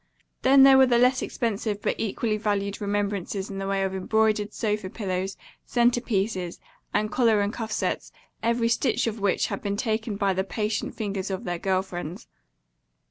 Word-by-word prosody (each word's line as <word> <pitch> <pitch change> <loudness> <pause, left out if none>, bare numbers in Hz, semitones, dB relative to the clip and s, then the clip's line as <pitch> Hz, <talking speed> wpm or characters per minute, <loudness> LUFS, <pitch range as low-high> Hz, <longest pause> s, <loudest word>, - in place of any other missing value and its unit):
Then 270 +1 +7
there 270 -1 +8
were 265 - +7
the 240 -1 +3
less 250 +2 +4
expensive 215 -3 -2
but - - 0
equally 220 0 -1
valued 205 -2 -1
remembrances 200 -1 -2
in 195 - -5
the 195 - -3
way 195 0 0
of 190 0 -1
embroidered 210 +2 +1
sofa 210 -4 -2
pillows, 190 -2 -3 0.3
center 240 0 +2
pieces, 195 -6 -2 0.3
and 215 0 0
collar 230 -4 +3
and 205 +1 0
cuff 225 -2 -5
sets, - - -2 0.3
every 235 0 +1
stitch 235 +3 +1
of 225 -1 -2
which 200 -2 +1
had - - -4
been 200 -1 -2
taken 220 -2 -1
by 200 -1 +1
the 190 +1 0
patient 210 +2 -2
fingers 200 -3 -3
of 190 -1 -3
their 175 -2 -3
girl 190 0 +1
friends. 175 -2 -7
210 Hz, 180 wpm, -26 LUFS, 195-230 Hz, 0.3 s, there